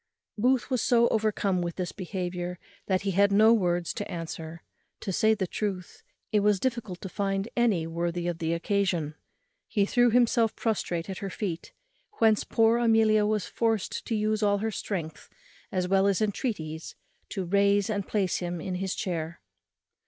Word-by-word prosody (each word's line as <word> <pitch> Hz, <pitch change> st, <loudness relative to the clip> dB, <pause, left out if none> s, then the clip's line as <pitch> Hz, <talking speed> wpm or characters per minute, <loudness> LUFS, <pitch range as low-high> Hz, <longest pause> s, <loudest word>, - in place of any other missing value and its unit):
Booth 250 Hz, +4 st, +1 dB
was 255 Hz, -3 st, +1 dB
so 235 Hz, -1 st, +4 dB
overcome 210 Hz, -4 st, +1 dB
with 170 Hz, -1 st, -3 dB
this 180 Hz, -2 st, -3 dB
behaviour, 180 Hz, -2 st, -4 dB, 0.3 s
that 190 Hz, -1 st, +1 dB
he 200 Hz, -, 0 dB
had 200 Hz, +2 st, +4 dB
no 215 Hz, +3 st, +6 dB
words 175 Hz, -5 st, +1 dB
to 205 Hz, -, -5 dB
answer. 165 Hz, -1 st, -6 dB, 0.4 s
To 195 Hz, -, -3 dB
say 220 Hz, +4 st, +3 dB
the 195 Hz, -3 st, -1 dB
truth, 195 Hz, -, -4 dB, 0.3 s
it 210 Hz, -, +4 dB
was 205 Hz, -1 st, +3 dB
difficult 235 Hz, -7 st, -3 dB
to -, -, -5 dB
find 195 Hz, +1 st, -1 dB
any 220 Hz, -9 st, +2 dB
worthy 170 Hz, +1 st, -2 dB
of 170 Hz, -1 st, -2 dB
the 165 Hz, 0 st, 0 dB
occasion. 170 Hz, -3 st, 0 dB, 0.5 s
He 200 Hz, -2 st, +1 dB
threw 245 Hz, +3 st, +3 dB
himself 235 Hz, -1 st, +3 dB
prostrate 180 Hz, -7 st, -1 dB
at 190 Hz, -1 st, -5 dB
her 195 Hz, -, -4 dB
feet, 180 Hz, -4 st, -4 dB, 0.4 s
whence 220 Hz, -, +3 dB
poor 225 Hz, +1 st, +3 dB
Amelia 220 Hz, -2 st, +4 dB
was 210 Hz, -2 st, 0 dB
forced 225 Hz, -4 st, -1 dB
to 230 Hz, -, 0 dB
use 215 Hz, 0 st, 0 dB
all 205 Hz, -1 st, +3 dB
her 220 Hz, +2 st, -2 dB
strength 165 Hz, -7 st, -5 dB, 0.4 s
as 185 Hz, -3 st, 0 dB
well 195 Hz, +1 st, +3 dB
as 200 Hz, -2 st, +2 dB
entreaties 195 Hz, -7 st, -3 dB, 0.3 s
to 190 Hz, -2 st, -3 dB
raise 200 Hz, +2 st, +3 dB
and 205 Hz, -3 st, -2 dB
place 195 Hz, -4 st, 0 dB
him 175 Hz, -1 st, -3 dB
in 185 Hz, +3 st, -4 dB
his 185 Hz, +1 st, -2 dB
chair. 170 Hz, -4 st, -3 dB
200 Hz, 170 wpm, -28 LUFS, 175-215 Hz, 0.5 s, no